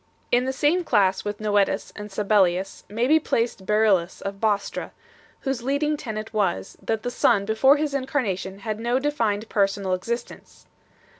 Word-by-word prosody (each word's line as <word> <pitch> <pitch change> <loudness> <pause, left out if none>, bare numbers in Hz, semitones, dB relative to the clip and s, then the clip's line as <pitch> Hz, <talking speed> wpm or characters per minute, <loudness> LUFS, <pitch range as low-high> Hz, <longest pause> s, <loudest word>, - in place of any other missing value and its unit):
In 245 +1 +3
the 265 - 0
same 300 +6 +2
class 195 - +2
with 205 0 -4
Noetus 205 -2 +1
and 210 0 -7
Sabellius 195 -2 +1
may 225 +4 0
be 310 +4 +5
placed 230 -9 -1
Beryllus 210 -5 +2
of 195 0 -6
Bostra, 210 -2 -1 0.5
whose 270 -3 -2
leading 285 +4 0
tenet 220 -5 -6
was, 185 - -1
that 225 -1 -2
the 245 - -2
Son 200 -4 +2
before 265 +7 +4
His 295 -1 -1
Incarnation 210 - -2
had 215 0 -3
no 240 +2 +1
defined 230 -7 -1
personal 195 -2 +1
J 230 +5 -1
See 240 - -10
p. - - -21
215 Hz, 165 wpm, -24 LUFS, 200-255 Hz, 0.5 s, be